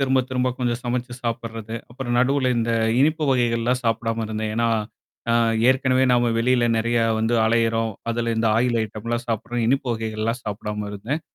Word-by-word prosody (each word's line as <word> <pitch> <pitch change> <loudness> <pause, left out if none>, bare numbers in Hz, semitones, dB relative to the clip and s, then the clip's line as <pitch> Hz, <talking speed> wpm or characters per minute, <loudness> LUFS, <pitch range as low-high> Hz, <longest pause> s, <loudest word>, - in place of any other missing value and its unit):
திரும்ப, 130 -1 +3
திரும்ப 130 0 +1
கொஞ்சம் 120 -1 -1
சமைச்சு 120 0 -2
சாப்பிட்றது. 115 -1 -4 0.2
அப்புறம் 120 -1 -4
நடுவுல 130 +1 +2
இந்த 115 0 0 0.3
இனிப்பு 155 +2 +2
வகைகள்லாம் 120 0 +1
சாப்பிடாம 115 0 0
இருந்தேன். 110 0 -3
ஏன்னா 115 0 +2 0.6
அ - - +3 0.4
ஏற்கனவே 130 0 +3
நாம 120 -1 +3
வெளியில 125 +1 +2
நெறைய 115 +1 +1 0.2
வந்து 110 +2 +1
அலையுறோம், 115 0 +1 0.2
அதுல 115 0 -1
இந்த 110 0 +1
ஆயில் 120 0 +2
ஐட்டம்லாம் 115 +2 -4
சாப்பட்றோம். 115 +2 -2
இனிப்பு 135 +2 +1
வகைகள்லாம் 110 +1 -2
சாப்பிடாம 105 0 -4
இருந்தேன். 115 +10 -3
115 Hz, 155 wpm, -23 LUFS, 115-125 Hz, 0.6 s, திரும்ப